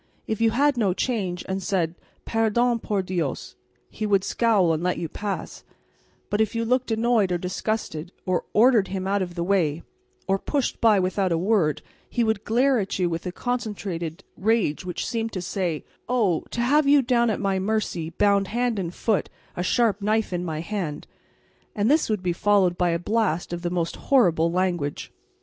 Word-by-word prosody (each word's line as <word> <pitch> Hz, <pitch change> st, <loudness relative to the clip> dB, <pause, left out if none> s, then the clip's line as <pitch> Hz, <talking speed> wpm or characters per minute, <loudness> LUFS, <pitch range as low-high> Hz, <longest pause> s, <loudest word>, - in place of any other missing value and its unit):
If 220 Hz, 0 st, -3 dB
you 225 Hz, -, +5 dB
had 280 Hz, +4 st, +2 dB
no 200 Hz, -6 st, +1 dB
change 190 Hz, -9 st, -2 dB
and 190 Hz, 0 st, -2 dB
said, 175 Hz, -4 st, 0 dB, 0.3 s
"Perdon, 230 Hz, +2 st, +1 dB
por 205 Hz, -3 st, -1 dB
Dios," 175 Hz, -7 st, -3 dB, 0.3 s
he 215 Hz, -, -4 dB
would 195 Hz, -2 st, +3 dB
scowl 205 Hz, -9 st, +2 dB
and 160 Hz, -, -2 dB
let 180 Hz, +1 st, 0 dB
you 170 Hz, -, -3 dB
pass; 205 Hz, +5 st, -5 dB, 0.7 s
but 205 Hz, -, +2 dB
if 220 Hz, +1 st, 0 dB
you 230 Hz, 0 st, 0 dB
looked 250 Hz, +2 st, +1 dB
annoyed 225 Hz, -3 st, +2 dB
or 175 Hz, -, +1 dB
disgusted, 180 Hz, -2 st, -3 dB
or 185 Hz, -1 st, 0 dB
ordered 225 Hz, -2 st, +5 dB
him 190 Hz, -1 st, -4 dB
out 200 Hz, +1 st, +1 dB
of 175 Hz, -2 st, -4 dB
the 170 Hz, -, -1 dB
way, 170 Hz, -5 st, +1 dB, 0.4 s
or 195 Hz, 0 st, +2 dB
pushed 280 Hz, +2 st, -2 dB
by 220 Hz, -3 st, +5 dB
without 185 Hz, 0 st, 0 dB
a 165 Hz, -, +2 dB
word, 165 Hz, -6 st, +1 dB, 0.3 s
he 240 Hz, -, 0 dB
would 220 Hz, -2 st, 0 dB
glare 255 Hz, +3 st, +3 dB
at 195 Hz, -2 st, -2 dB
you 180 Hz, -2 st, 0 dB
with 165 Hz, +2 st, -3 dB
a -, -, -2 dB
concentrated 200 Hz, -9 st, -4 dB
rage 205 Hz, -6 st, +1 dB
which 180 Hz, -1 st, -4 dB
seemed 225 Hz, -1 st, -2 dB
to 185 Hz, -, -3 dB
say, 175 Hz, -3 st, -2 dB, 0.2 s
"Oh, 215 Hz, -10 st, +1 dB
to 235 Hz, -, -2 dB
have 285 Hz, +4 st, +3 dB
you 285 Hz, -1 st, +6 dB
down 235 Hz, -1 st, +2 dB
at 215 Hz, -, -1 dB
my 195 Hz, -2 st, 0 dB
mercy, 190 Hz, -5 st, -1 dB
bound 200 Hz, +3 st, +2 dB
hand 240 Hz, -1 st, 0 dB
and 170 Hz, -3 st, -3 dB
foot, 210 Hz, +2 st, 0 dB, 0.3 s
a -, -, -2 dB
sharp 210 Hz, +2 st, +2 dB
knife 215 Hz, -1 st, 0 dB
in 175 Hz, 0 st, -1 dB
my 160 Hz, -3 st, -3 dB
hand!" 170 Hz, -5 st, -4 dB, 0.7 s
And 210 Hz, +5 st, +2 dB
this 305 Hz, -3 st, +3 dB
would 210 Hz, -4 st, -1 dB
be 175 Hz, -1 st, 0 dB
followed 190 Hz, -1 st, +3 dB
by 175 Hz, 0 st, +1 dB
a 170 Hz, -, +1 dB
blast 175 Hz, -3 st, -1 dB
of 175 Hz, -, -4 dB
the 175 Hz, -, -1 dB
most 170 Hz, -2 st, -2 dB
horrible 170 Hz, -11 st, +3 dB
language. 175 Hz, -5 st, -1 dB
195 Hz, 190 wpm, -24 LUFS, 175-225 Hz, 0.7 s, you